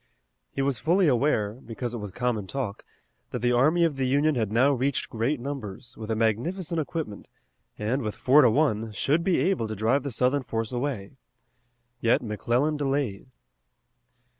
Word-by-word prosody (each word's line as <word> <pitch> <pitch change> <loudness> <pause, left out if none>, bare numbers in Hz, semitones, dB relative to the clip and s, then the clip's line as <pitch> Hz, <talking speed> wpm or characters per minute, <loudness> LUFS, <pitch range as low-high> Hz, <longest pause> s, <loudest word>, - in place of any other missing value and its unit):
He 135 - -2
was 135 -4 0
fully 175 - +3
aware, 120 -6 +2
because 120 0 -6
it 120 - -4
was 105 -2 -6
common 120 -3 -2
talk, 125 -6 -4 0.5
that 125 - -5
the 120 - +3
army 155 +8 +4
of 160 -5 +1
the 130 -1 0
Union 145 +4 +3
had 110 -6 -1
now 130 +6 +4
reached 135 +1 -1
great 120 +5 0
numbers, 120 -3 -6
with 110 -1 -8
a 110 - +1
magnificent 160 - 0
equipment, 150 - -5 0.5
and, 115 +6 -1
with 105 -3 -3
four 140 +4 +5
to 125 - +6
one, 115 -4 +1
should 150 +11 +1
be 180 -1 +2
able 185 -12 +1
to 110 - -4
drive 115 +7 +2
the 140 - -4
Southern 130 +3 +1
force 115 -2 -3
away. 125 -3 -3 0.8
Yet 115 +1 +2
McClellan 120 +7 0
delayed. 135 -7 -1
125 Hz, 170 wpm, -26 LUFS, 110-145 Hz, 0.8 s, to